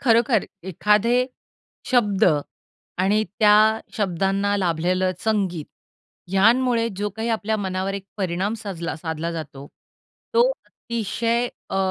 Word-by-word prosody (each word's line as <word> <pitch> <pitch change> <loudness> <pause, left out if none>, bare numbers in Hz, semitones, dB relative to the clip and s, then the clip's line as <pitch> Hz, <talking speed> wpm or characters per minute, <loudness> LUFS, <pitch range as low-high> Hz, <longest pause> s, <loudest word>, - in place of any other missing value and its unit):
खरोखर 230 -3 +3 0.2
एखादे 210 +6 +2 0.7
शब्द 215 -5 +3 0.7
आणि 205 +3 +2 0.2
त्या 210 -2 +6 0.4
शब्दांना 195 +1 0
लाभलेलं 185 0 +1
संगीत, 195 -7 -1 0.7
ह्यांमुळे 230 +4 +3
जो 205 +1 -1
काही 225 +1 -2
आपल्या 220 -1 0
मनावर 190 -1 -2
एक 200 -1 -6
परिणाम 190 +2 -1
साजला 170 -5 -4
साधला 160 0 -4
जातो, 140 -4 -7 0.7
तो 480 +1 +5 0.2
अतिशय 235 +1 -2 0.2
अ, - - -2
205 Hz, 105 wpm, -23 LUFS, 185-225 Hz, 0.7 s, त्या